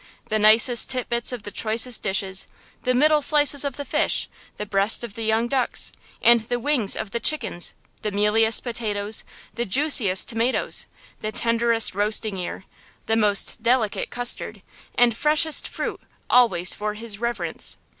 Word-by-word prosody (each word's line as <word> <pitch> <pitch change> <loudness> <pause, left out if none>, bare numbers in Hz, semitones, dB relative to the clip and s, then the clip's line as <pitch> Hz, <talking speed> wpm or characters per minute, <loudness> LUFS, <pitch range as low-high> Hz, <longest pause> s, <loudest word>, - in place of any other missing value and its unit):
The 215 - 0
nicest 220 +3 +4
tit 255 -2 -1
bits 235 0 -1
of 245 -4 -7
the 205 - -8
choicest 225 +3 0
dishes–the 190 +5 -2
middle 300 +3 +3
slices 290 -1 +4
of 280 -3 -4
the 285 - -6
fish, - - 0 0.3
the 210 - -5
breast 200 +2 +1
of 235 -4 -7
the 225 - -8
young 220 +1 0
ducks, 255 0 0 0.3
and 235 0 +6
the 240 +2 -4
wings 245 -6 +1
of 215 -2 -5
the 235 - -2
chickens, 230 - -2 0.3
the 210 - -2
mealiest 210 +2 +2
potatoes, 220 -3 -3 0.3
the 240 - -3
juiciest 225 -5 +4
tomatoes, 230 +3 -1 0.3
the 215 - -4
tenderest 230 0 0
roasting 210 0 -1
ear, 180 +1 -6 0.4
the 225 - 0
most 210 0 +1
delicate 230 -2 0
custard, 245 0 -1 0.3
and 240 -2 +3
freshest 305 +4 +1
fruit - - -5 0.3
always 225 -8 +3
for 210 0 -4
his 215 -2 -6
reverence! 210 -9 -2
225 Hz, 155 wpm, -23 LUFS, 210-245 Hz, 0.4 s, and